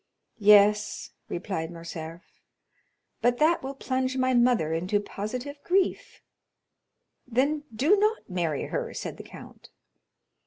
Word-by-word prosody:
"Yes," 210 0 +4 0.2
replied 170 -2 -3
Morcerf, 165 0 -8 1.0
"but 245 +1 +2
that 320 +4 +3
will 270 +1 -6
plunge 260 0 -2
my 255 0 +2
mother 240 -10 +3
into 180 +5 0
positive 250 +8 -6
grief." 375 +1 0 1.0
"Then 280 +5 0
do 280 - +3
not 425 +2 0
marry 170 -6 -2
her," - - -4
said - - -5
the - - -9
count. - - -13
235 Hz, 115 wpm, -27 LUFS, 180-270 Hz, 1.0 s, Yes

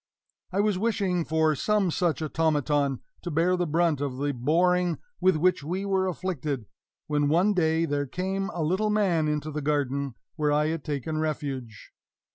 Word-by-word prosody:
I 195 +2 +2
was 205 -3 +1
wishing 195 -5 0
for 160 0 +2
some 200 +4 +1
such 160 -4 0
automaton, 145 -3 +1 0.2
to 175 - -5
bear 170 +3 +2
the 175 -1 -1
brunt 160 -2 +1
of 135 -3 -2
the 145 +1 0
boring 175 +7 +2 0.2
with 185 -2 +4
which 175 0 +2
we 185 +6 -3
were 190 -1 +1
afflicted, 155 -9 -3 0.4
when 145 -1 +1
one 180 +7 +3
day 165 -2 +2
there 145 -2 -1
came 190 +6 -2
a 170 - -2
little 190 +7 +1
man 190 -7 +2
into 150 0 -2
the 150 0 -3
garden, 140 -3 -1 0.2
where 150 -2 +1
I 150 +1 +2
had 160 -2 -3
taken 155 +1 -3
refuge. 140 -7 -4
160 Hz, 170 wpm, -27 LUFS, 145-180 Hz, 0.4 s, with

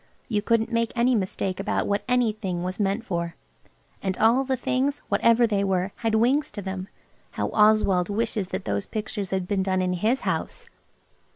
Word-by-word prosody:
You 210 -4 0
couldn't 230 +2 +1
make 230 -1 +1
any 245 +1 +3
mistake 190 -3 -1
about 195 - -1
what 200 0 0
anything 215 -8 0
was 185 +2 -4
meant 205 +3 0
for. 170 -3 -3 0.7
And 190 -1 -2
all 235 +5 +4
the 260 -1 -1
things, 265 +3 0
whatever 230 +4 +4
they 205 -3 +1
were, 190 0 0
had 225 -2 0
wings 260 +6 +2
to 205 - -5
them. 190 0 -5 0.5
How - - -2
Oswald 210 -4 +3
wishes 215 -2 -1
that - - -5
those 100 -1 -2
pictures 210 -2 -4
had 190 -2 -2
been 200 -1 0
done 190 0 0
in 180 0 0
his 220 +9 +1
house! 485 - -3
210 Hz, 180 wpm, -25 LUFS, 190-230 Hz, 0.7 s, all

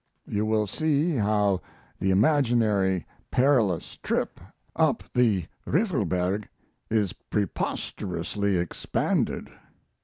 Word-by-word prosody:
You 105 +1 -1
will 110 -1 +2
see 155 - +1
how 105 -5 +2 0.4
the 95 - +1
imaginary 105 - +3 0.2
perilous 125 - +2
trip - - -2 0.4
up - - +2
the 110 -8 +3 0.2
Riffelberg 105 - 0 0.4
is 105 -5 +1
preposterously 100 -1 -2
expanded. 85 -1 -1
105 Hz, 85 wpm, -26 LUFS, 95-125 Hz, 0.4 s, imaginary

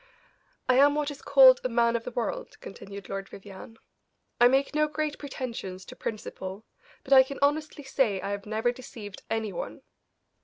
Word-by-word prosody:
"I 255 -1 +4
am 285 +2 +6
what 295 -1 -1
is 280 - -10
called 265 -2 +7
a 255 - 0
man 235 0 +2
of 230 - -2
the - - -3
world," 365 - -4
continued 200 0 -10
Lord 195 0 -5
Vivianne. 200 +3 -11 0.6
"I 240 - +8
make 270 +3 +2
no 305 0 +2
great 300 0 -3
pretensions 230 -9 -6
to - - -11
principle, 200 -1 -6 0.4
but 275 - +1
I 265 - +10
can 270 +1 -4
honestly 295 +1 0
say 260 -7 +1
I 200 - -4
have 200 0 -5
never 220 +3 0
deceived 230 -5 -10
any 220 -3 -2
one. - - -6
245 Hz, 180 wpm, -27 LUFS, 205-280 Hz, 0.6 s, I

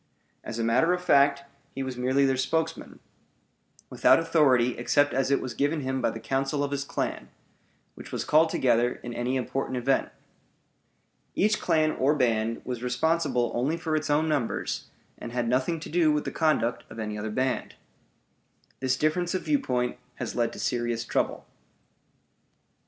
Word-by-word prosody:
As 115 - -6
a 115 - -1
matter 125 +10 +3
of 180 0 -3
fact, 140 -3 +4 0.3
he 135 - -2
was 130 -1 -4
merely 130 +3 +2
their 135 -1 +2
spokesman, 160 +5 -2 0.9
without - - +5
authority 145 -7 +3
except 145 +4 +2
as 135 0 +1
it 140 - +3
was 125 - -5
given 145 +5 0
him 130 0 -2
by - - +2
the 115 - -6
council 135 +3 -1
of 140 - -2
his 140 -1 -1
clan, - - -4 0.6
which - - -11
was - - -3
called 160 +2 +4
together 120 -4 +2
in 120 - -6
any 120 +2 -1
important 130 0 -2
event. 135 +2 +1 1.3
Each 215 +2 +2
clan 155 -2 +2
or 140 +2 +1
band 115 -4 0
was 125 -2 -4
responsible 125 -1 0
only 135 +7 0
for 165 -2 -2
its 155 0 -2
own 150 +2 +2
members, 145 -7 -2 0.3
and 120 - -7
had 120 -1 -1
nothing 130 +7 0
to - - -7
do 160 -1 +3
with 150 0 0
the - - -3
conduct 150 -7 +1
of 110 - -11
any 105 -1 -4
other 105 +1 -4
band. 130 +3 -2 1.0
This 130 0 0
difference 175 +5 0
of 185 - -2
viewpoint 125 - 0 0.2
has - - -5
led 115 -1 +1
to - - -9
serious 120 -1 -1
trouble. - - -1
135 Hz, 170 wpm, -27 LUFS, 120-155 Hz, 1.3 s, without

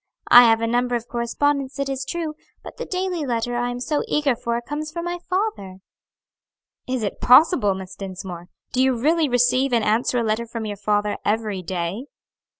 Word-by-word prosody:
I 245 0 +10
have 225 -1 +4
a - - +1
number 245 +1 0
of 235 0 -4
correspondents, 270 +3 -1
it 275 0 -1
is 270 0 -3
true; 330 -1 -3 0.3
but - - -10
the - - -6
daily 365 -3 -2
letter 240 -2 -2
I 245 0 -1
am 245 0 -4
so 295 +4 -1
eager 290 -4 +1
for 235 0 -2
comes 295 +5 -5
from 340 +1 -5
my 350 0 -3
father." 365 - -2 1.1
"Is 255 -3 -2
it 205 - -4
possible, 255 - +5
Miss 190 -1 -8
Dinsmore! 185 -3 -7 0.3
do 255 - +2
you 260 -2 +2
really 315 +3 +2
receive 245 +2 +2
and 230 -2 +2
answer 225 +4 +1
a 235 - +1
letter 220 +1 -1
from 230 -1 -5
your 205 -1 -5
father 205 0 0
every 210 -3 -1
day?" 180 +6 -4
245 Hz, 190 wpm, -22 LUFS, 215-280 Hz, 1.1 s, I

